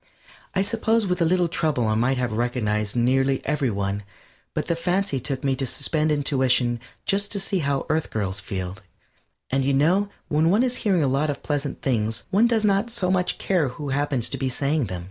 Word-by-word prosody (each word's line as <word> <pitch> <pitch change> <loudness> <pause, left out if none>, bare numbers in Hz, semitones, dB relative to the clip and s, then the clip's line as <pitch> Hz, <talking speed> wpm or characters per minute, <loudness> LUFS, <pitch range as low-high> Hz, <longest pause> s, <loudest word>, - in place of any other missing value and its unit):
I 190 - +3
suppose 225 +1 +1
with 180 -2 -1
a - - +5
little 180 +1 +3
trouble 155 -8 0
I 110 - +2
might 125 +4 +1
have 125 -1 -1
recognized 110 -2 -1
nearly 135 +2 +2
every 145 -3 +1
one, 100 -1 -2 0.5
but - - -1
the 170 - 0
fancy 180 -2 0
took 135 +1 -3
me 135 -1 +1
to 135 - -1
suspend 155 +4 0
intuition 130 -4 +2 0.3
just 200 +1 +1
to 200 - -1
see 195 0 -1
how 140 -3 0
Earth 155 0 0
girls 100 -3 -2
feel, 95 -4 -5 0.7
and 135 +1 +2
you 135 +1 +2
know 180 +9 +3 0.2
when 155 +1 +2
one 210 +7 +4
is 250 -1 -1
hearing 185 -6 +2
a - - +2
lot 140 +4 +1
of 145 - -4
pleasant 145 -2 -3
things 115 -4 0
one 210 +5 +5
does 225 -2 +1
not 200 +3 +2 0.2
much 180 -1 +1
care 180 -7 +1
who 140 +3 -6
happens 135 -3 0
to 135 - -5
be 130 0 0
saying 140 +2 0
them. 90 -3 -5
140 Hz, 205 wpm, -24 LUFS, 125-180 Hz, 0.7 s, a